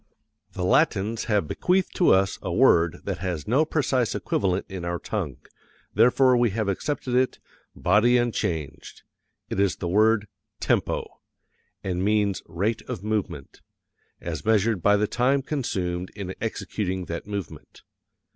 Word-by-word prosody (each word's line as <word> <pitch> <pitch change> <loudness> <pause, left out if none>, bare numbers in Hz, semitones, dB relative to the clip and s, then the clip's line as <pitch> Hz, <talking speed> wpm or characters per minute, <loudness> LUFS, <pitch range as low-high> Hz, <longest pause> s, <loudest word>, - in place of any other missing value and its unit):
The 90 - -4
Latins 110 - +2
have 105 -8 +1
bequeathed 185 - 0
to 180 - +4
us 95 0 +2
a - - -4
word 85 -1 +3
that - - -4
has 90 -5 -4
no 135 +8 +3
precise 130 -6 0
equivalent 95 -1 -1
in 95 -3 -7
our 85 0 -2
tongue, - - -4 0.6
therefore 125 +4 +5
we 120 -1 +3
have 105 +1 -2
accepted 125 +6 -2
it, 130 +1 +2 0.4
body 110 +7 +3
unchanged 95 - -3 0.5
it - - -2
is 100 -2 +2
the 90 - -5
word 105 +3 +3 0.3
tempo, - - 0 0.8
and 90 -1 -2
means 105 -1 +1
rate 100 +7 -1
of 90 - -5
movement, 105 -10 -3 0.6
as - - -5
measured 110 -2 +2
by 105 +4 +4
the 105 - +2
time 130 +5 +1
consumed 90 - -2
in 95 -3 -5
executing 95 -4 -3
that 85 +3 -6
movement. 100 -3 -7
105 Hz, 140 wpm, -25 LUFS, 95-120 Hz, 0.8 s, therefore